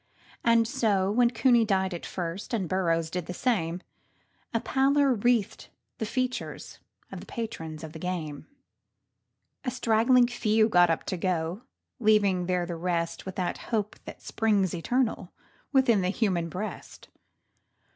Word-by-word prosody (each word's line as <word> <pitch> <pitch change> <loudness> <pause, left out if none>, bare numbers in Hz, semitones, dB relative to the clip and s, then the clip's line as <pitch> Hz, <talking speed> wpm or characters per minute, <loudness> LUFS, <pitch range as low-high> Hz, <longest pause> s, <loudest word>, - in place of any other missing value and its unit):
And 230 -1 +4
so, 210 -7 +1
when 240 +2 +4
Cooney 235 0 +4
died 190 -3 0
at 170 - -6
first, 180 +5 -4
and 190 -5 -2
Burrows 165 -3 0
did 180 -2 -4
the 180 - -5
same, 180 -8 -1 0.7
A 230 - +1
pallor 275 +2 +2
wreathed 235 -2 0 0.3
the 220 - -2
features 255 +2 -3 0.3
of - - -6
the - - -12
patrons 165 -10 -6
of 160 -1 -8
the 160 - -8
game. 160 -5 -4 1.2
A 260 - -1
straggling 245 0 +3
few 220 -3 +2
got 175 -3 +5
up 165 - 0
to 185 - -3
go, 175 +2 -1 0.4
leaving 205 -5 +3
there 180 -1 0
the 170 0 -5
rest, 170 +1 -2
With 190 - -5
that 180 -2 -2
hope 215 -3 -1
which - - -8
springs 205 -5 +1
eternal 220 +2 -1 0.4
within 260 -7 +4
the 180 - 0
human 185 -5 0
breast. 205 +6 -7
200 Hz, 145 wpm, -27 LUFS, 175-230 Hz, 1.2 s, got